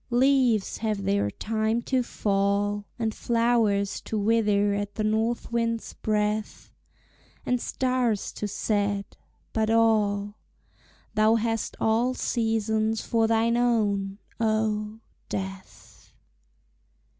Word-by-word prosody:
Leaves 250 -4 +3
have 215 -3 -2
their 195 - +1
time 220 - -1
to 255 +2 0
fall, 205 -2 0
And 225 -2 -1
flowers 230 -4 +1
to 220 - -3
wither 205 -1 +2
at 205 0 -3
the 215 - -1
north 220 +3 0
wind's 230 -1 -1
breath, 210 0 -2 0.7
And 250 -1 0
stars 250 -5 0
to 210 - -4
set 205 -1 -1 0.4
but 220 -1 +1
all, 210 -2 +2 0.7
Thou 215 +1 +4
hast 225 -1 -1
all 235 +3 +2
seasons 220 -2 0
for 225 -1 +2
thine 230 +1 +2
own, 205 -5 +1 0.2
oh! 215 -1 0 0.3
Death. 190 0 -7
220 Hz, 105 wpm, -26 LUFS, 205-230 Hz, 0.7 s, Thou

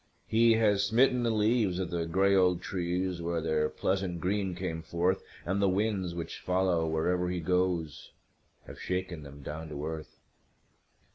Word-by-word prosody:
He 115 +1 +4
has 105 -3 +3
smitten 125 +4 +3
the 120 - +1
leaves 110 -3 +2
of 95 -2 -3
the 85 -1 -1
gray 95 +4 +3
old 90 -2 +4
trees 90 0 -2
where 85 0 -1
their 75 -1 0
pleasant 95 -2 -1
green 95 +1 -1
came 85 -3 -4
forth, 85 +3 0 0.2
And 95 +3 0
the 100 - +4
winds, 95 -3 0
which 85 -1 -5
follow 90 -3 +1
wherever 90 +3 0
he 90 0 -2
goes, 90 -2 -1 0.6
have - - -11
shaken 90 -3 -3
them 70 -1 -11
down 80 +2 -6
to 75 0 -5
earth. 80 -1 -6
90 Hz, 160 wpm, -30 LUFS, 85-95 Hz, 0.6 s, He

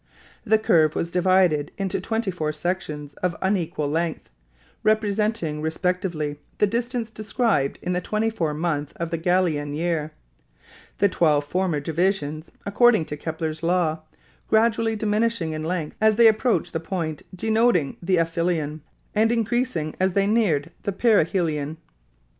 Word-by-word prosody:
The 220 - +4
curve 160 -7 +3
was 170 - -2
divided 180 -5 +3
into 195 -2 -2
twenty 225 -3 -1
four 155 -4 -2
sections 150 -3 -4
of 180 -2 0
unequal 175 -6 -1
length, 160 +2 -2 0.5
representing 210 -6 0
respectively 160 -2 -2 0.2
the - - +4
distance 235 +1 -2
described 215 - 0
in 180 - -1
the 180 - -1
twenty 215 +3 -1
four 160 -8 -2
months 150 -3 -2
of 170 -1 -5
the 165 - -1
Gallian 160 -5 +1
year, 160 -1 -1 0.9
the 200 - +4
twelve 155 -6 +2
former 175 0 0
divisions, 160 0 -1
according 220 -3 +4
to 150 - -5
Kepler's 160 0 -4
law, 170 -2 +1 0.5
gradually 225 0 +2
diminishing 215 -4 0
in 155 0 -4
length 165 -2 -3
as 220 0 +5
they 230 +1 +7
approached 220 -4 +2
the 160 - -1
point 165 -3 -4
denoting 220 - +2
the 180 +1 +1
aphelion 165 -2 -1 0.3
and 220 +2 +3
increasing 230 -9 -1
as 185 0 +2
they 195 +1 +2
neared 200 -10 +1
the 200 - -2
perihelion. 165 -8 +1
175 Hz, 140 wpm, -24 LUFS, 155-215 Hz, 0.9 s, they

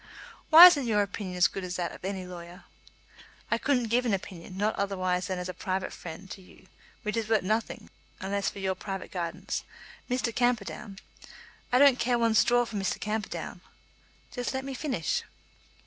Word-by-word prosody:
"Why 325 +3 +12
isn't 290 -8 +6
your 210 -2 +3
opinion 195 -2 -5
as 175 -3 +6
good 195 - -6
as 180 0 -4
that 175 -1 -2
of - - -12
any 190 -1 -3
lawyer?" 175 0 -10 0.9
"I 230 - +2
couldn't 250 -4 +1
give 245 +2 +2
an 230 -5 +2
opinion; 185 -1 -9
not 210 +2 +1
otherwise 185 -2 -1
than 185 -2 -2
as 180 0 -4
a 185 - -5
private 185 +1 -3
friend 175 +3 -9
to 195 - -8
you, 180 - -18 0.4
which 210 0 -2
is 225 -1 -2
worth 220 -3 +3
nothing, 215 +4 -2 0.3
unless 200 +1 -1
for - - -12
your 190 -1 -1
private 195 0 -6
guidance. 180 +1 -4 0.5
Mr. 250 -2 -1
Camperdown 220 -4 -1 0.4
" - - -22
"I 250 - +4
don't 275 -1 +6
care 240 0 +2
one 230 -1 +2
straw 240 +4 +4
for 225 -2 -6
Mr. 195 -2 -1
Camperdown." 215 0 -4 0.7
"Just 245 0 -3
let 265 0 -3
me 275 - -5
finish." 255 - -1
200 Hz, 185 wpm, -28 LUFS, 185-235 Hz, 0.9 s, Why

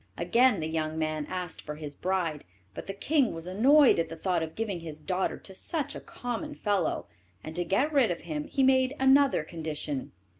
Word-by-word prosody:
Again 240 -6 +3
the 155 - -2
young 160 -1 -2
man 155 -1 -2
asked 180 -2 -4
for 150 - -6
his 150 -1 -7
bride, 170 -2 -1 0.3
but - - -8
the 195 - -3
king 275 - +1
was 165 0 -7
annoyed 255 - +5
at 165 -1 0
the 165 - -6
thought 175 0 0
of 160 0 -5
giving 210 -5 -2
his 160 -2 -7
daughter 185 +4 -1
to 190 - -12
such 290 - -3
a - - -6
common 245 +5 -5
fellow, 200 - 0 0.4
and 160 - -7
to 175 - 0
get 200 - +1
rid 270 -5 +4
of 175 - -3
him 155 -3 -4
he 270 - 0
made 260 0 +4
another 265 - +5
condition. 150 -4 -4
180 Hz, 200 wpm, -29 LUFS, 160-255 Hz, 0.4 s, annoyed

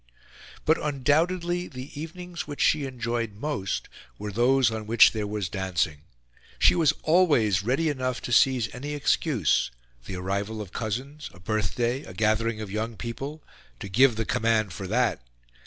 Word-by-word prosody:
But, 160 +2 +3
undoubtedly, 170 +5 +1
the 130 0 -9
evenings 170 +3 -7
which 145 -1 -7
she 150 -2 +3
enjoyed 120 -4 -3
most 115 -5 -3 0.3
were 105 0 -5
those 120 +3 +3
on 110 -1 -5
which 115 0 +7
there 105 -2 -3
was 105 -2 -2
dancing. 90 -5 -1 0.6
She - - +6
was 165 -4 +4
always 145 - +4
ready 130 +10 +1
enough 130 -4 -1
to - - -5
seize 120 -2 +3
any 145 +4 -5
excuse 140 - +1 0.4
the 95 - -5
arrival 100 +4 -3
of 100 -4 -7
cousins 130 +7 -4
a - - -15
birthday 110 +6 -1
a 90 - -11
gathering 110 +2 +1
of 105 -3 -6
young 110 +2 -3
people 135 +6 -6 0.4
to - - -6
give 125 +5 +4
the 115 +1 -2
command 110 -4 +1
for 95 +1 -6
that. 115 - +1
120 Hz, 155 wpm, -26 LUFS, 105-145 Hz, 0.6 s, which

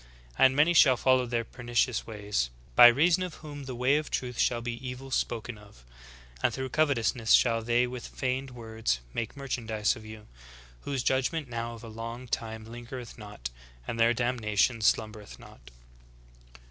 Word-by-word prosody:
And 130 0 +5
many 155 +4 +4
shall 130 -6 +6
follow 130 0 +3
their 120 -1 -1
pernicious 120 0 -1
ways, 105 - -2 0.3
by 120 - +11
reason 165 +9 +4
of 180 -3 -4
whom 145 -3 -9
the 130 -2 -6
way 130 +4 +3
of 155 - -3
truth 125 -2 -3
shall 120 - +2
be 120 +1 -5
evil 130 +1 -7
spoken 120 -3 -2
of. 100 -12 -17 0.6
And - - +2
through 130 0 -4
covetousness 125 -6 +2
shall 115 -2 +4
they 120 +2 +2
with 125 -1 -6
feigned 130 +1 -3
words 110 - -2
make 115 +4 -4
merchandise 115 -5 -1
of 110 - -11
you; 110 0 -10 0.6
whose 135 -3 -2
judgment 135 +2 0
now 115 0 -4
of 115 - -13
a - - -8
long 115 +3 -7
time 110 -2 -4
lingereth 120 +1 -8
not, 105 - -7 0.4
and 115 - -4
their 115 +1 +5
damnation 115 -1 +1
slumbereth 110 -1 0
not.'" - - -15
120 Hz, 165 wpm, -29 LUFS, 110-130 Hz, 0.6 s, by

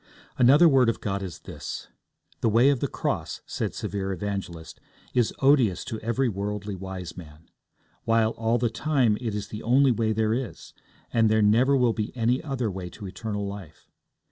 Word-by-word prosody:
Another 140 +7 +7
word 130 -6 +5
of 115 - -2
God 100 -1 -2
is 90 -5 -7
this. - - -7 0.5
The 115 - +2
way 120 +6 +5
of 135 - 0
the - - 0
cross, - - -3
said - - -3
severe 95 -1 -3
Evangelist, 90 -4 -5 0.3
is 120 -3 +2
odious 130 -9 +4
to 110 - -5
every 115 +4 0
worldly 105 0 -3
wise 95 -2 -7
man; 80 -2 -12 0.6
while, 115 -1 +3
all 115 +1 0
the 120 -1 0
time, 130 -5 +2
it 115 -4 -3
is 105 0 -4
the 105 - -6
only 130 +3 +4
way 115 -2 0
there 110 0 +1
is, 125 -1 -5 0.4
and 115 -2 +4
there 110 0 +3
never 125 +7 +4
will 125 -3 +3
be 110 +3 -4
any 120 +4 +1
other 130 -7 -2
way 90 -1 -6
to 100 - -10
eternal 105 +1 -4
life. 100 -6 -9
110 Hz, 180 wpm, -26 LUFS, 100-120 Hz, 0.6 s, Another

